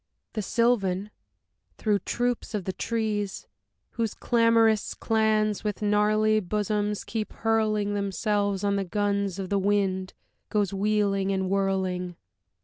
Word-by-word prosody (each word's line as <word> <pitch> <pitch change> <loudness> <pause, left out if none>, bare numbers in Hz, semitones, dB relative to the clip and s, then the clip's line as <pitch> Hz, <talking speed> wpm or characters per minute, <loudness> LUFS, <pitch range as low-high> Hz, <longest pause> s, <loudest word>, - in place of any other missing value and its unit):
The 215 - -2
Sylvan, 205 -3 +1 0.7
through 210 -2 +1
troops 240 +2 -2
of 205 - -2
the 190 - -2
trees, 215 -3 -2 0.5
Whose 230 -2 -2
clamorous 230 -2 +3
clans 215 -2 +1
with 210 0 -3
gnarly 215 +1 +3
bosoms 210 +1 -1
keep 220 -2 -4
hurling 215 -2 +1
Themselves 200 0 0
on 200 0 +1
the 200 - 0
guns 200 0 -1
of 190 -2 -4
the 200 - +1
wind, 190 -2 0 0.3
goes 205 -3 0
wheeling 200 -1 +1
and 190 -1 -1
whirling. 190 -2 0
205 Hz, 125 wpm, -26 LUFS, 195-215 Hz, 0.7 s, clamorous